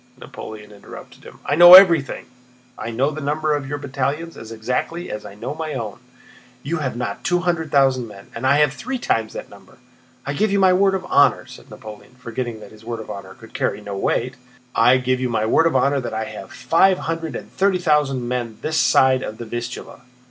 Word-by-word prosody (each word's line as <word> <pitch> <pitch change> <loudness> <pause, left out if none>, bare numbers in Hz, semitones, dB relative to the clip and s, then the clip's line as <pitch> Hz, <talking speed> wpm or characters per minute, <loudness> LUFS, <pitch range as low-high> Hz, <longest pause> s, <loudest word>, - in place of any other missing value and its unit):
Napoleon 105 -1 -10
interrupted 100 - -13
him. - - -13
"I - - -1
know 175 +3 +10
everything. 170 -7 +6 0.5
I - - -6
know 130 +6 0
the 155 +1 -7
number 150 +2 -1
of 140 -2 -4
your 145 - -3
battalions 145 +4 -3
as 115 0 -10
exactly 125 +10 -3
as 105 - -6
I 100 - -12
know 105 - -5
my 155 -1 -5
own. 110 -5 -5 0.6
You 165 +5 -2
have 135 -6 -3
not 120 -5 -4
two 175 0 +1
hundred 170 -3 -1
thousand 135 -4 +2
men, 100 -2 -14
and 125 +3 -2
I 140 +2 +4
have 150 -2 +2
three 260 - -5
times 115 - -1
that - - -7
number. - - -17 0.5
I 140 - -3
give 215 +8 0
you 200 - +2
my 190 -2 +4
word 195 +1 +3
of 190 - -4
honor," 140 0 +3
said - - -14
Napoleon, 110 +3 -12
forgetting 120 -2 -5
that - - -12
his 110 0 -16
word 115 0 -5
of 110 - -8
honor 95 -1 -9
could 115 - -16
carry - - -2
no 105 -1 -7
weight—"I 125 +2 0
give 130 0 -1
you 130 -1 -1
my 110 -2 0
word 160 +8 +3
of 165 - -1
honor 140 +2 +2
that 120 -4 -5
I 110 0 -2
have 95 -2 -9
five 170 +9 +2
hundred 165 -1 -4
and - - -8
thirty 195 -1 +1
thousand 150 -7 +1
men 120 -3 -3
this 155 0 -1
side 130 -1 +4
of 110 - -6
the 120 - -7
Vistula. 120 +3 -7
130 Hz, 215 wpm, -21 LUFS, 115-160 Hz, 0.6 s, know